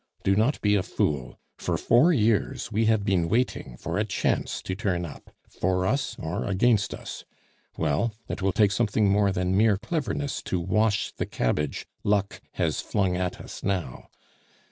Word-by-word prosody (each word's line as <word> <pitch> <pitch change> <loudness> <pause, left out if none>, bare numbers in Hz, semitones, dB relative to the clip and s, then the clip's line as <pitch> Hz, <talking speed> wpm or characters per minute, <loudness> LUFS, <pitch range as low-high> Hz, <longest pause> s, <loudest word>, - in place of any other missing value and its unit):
Do 95 - +3
not 115 +8 +2
be 105 -1 +3
a 100 - +3
fool. 75 -7 -2 0.2
For - - -1
four 125 +10 +4
years 115 - +1
we 110 +1 +2
have 110 -2 +2
been 90 -5 +1
waiting 115 - -1
for - - -3
a - - +3
chance - - -1
to 95 - -3
turn 95 -3 -1
up, 75 - -11 0.2
for 90 0 0
us 135 +8 0
or 80 +2 -3
against 100 +2 +2
us; - - -8 0.5
well, 80 +9 0
it - - -4
will 95 +1 +2
take 100 +1 +3
something 105 0 +2
more 100 0 +3
than 90 0 0
mere 105 0 +4
cleverness 145 - -2
to 90 - -1
wash 105 +4 +1
the - - -4
cabbage 75 +4 -1 0.2
luck 100 -1 0
has - - 0
flung 95 -3 0
at 90 0 -2
us - - -9
now. 95 -9 -3
100 Hz, 170 wpm, -26 LUFS, 90-110 Hz, 0.5 s, four